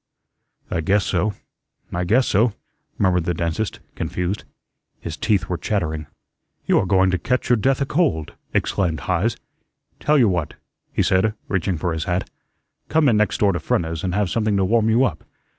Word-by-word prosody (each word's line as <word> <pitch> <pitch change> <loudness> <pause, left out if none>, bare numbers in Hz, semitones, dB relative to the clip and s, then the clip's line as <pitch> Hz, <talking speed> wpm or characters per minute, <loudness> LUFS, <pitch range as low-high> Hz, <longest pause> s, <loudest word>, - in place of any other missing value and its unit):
"I 80 - 0
guess 100 +4 +2
so 105 -2 0 0.6
I 90 +1 -1
guess 120 +8 +3
so," 110 +3 +3 0.4
murmured 90 -4 +2
the 90 -2 0
dentist, 85 +6 -2
confused. 90 +3 -3 0.5
His 80 - -5
teeth 100 -3 +1
were 90 -2 -2
chattering. 80 -7 -2 0.6
"YOU'RE 95 - +3
going 95 -1 +4
to 90 - 0
catch 125 +5 0
your - - +7
death 135 +5 +1
a - - +2
cold," 140 - 0 0.2
exclaimed 85 -7 0
Heise. 95 - 0 0.6
"Tell 150 0 +3
you 125 -5 +5
what," 85 -6 -1 0.4
he - - +1
said, 95 +3 +2
reaching 95 -2 0
for 85 +1 -1
his 80 -1 -3
hat, 90 +1 -1 0.6
"come 155 -1 +3
in 110 - +3
next 105 0 +1
door 100 -2 +3
to 85 - -1
Frenna's 80 -1 -1
and 90 -1 -1
have 100 -4 0
something 110 -3 +1
to 95 - +2
warm 110 +2 +3
you 115 +4 +4
up. 80 - -3
95 Hz, 175 wpm, -22 LUFS, 85-110 Hz, 0.6 s, your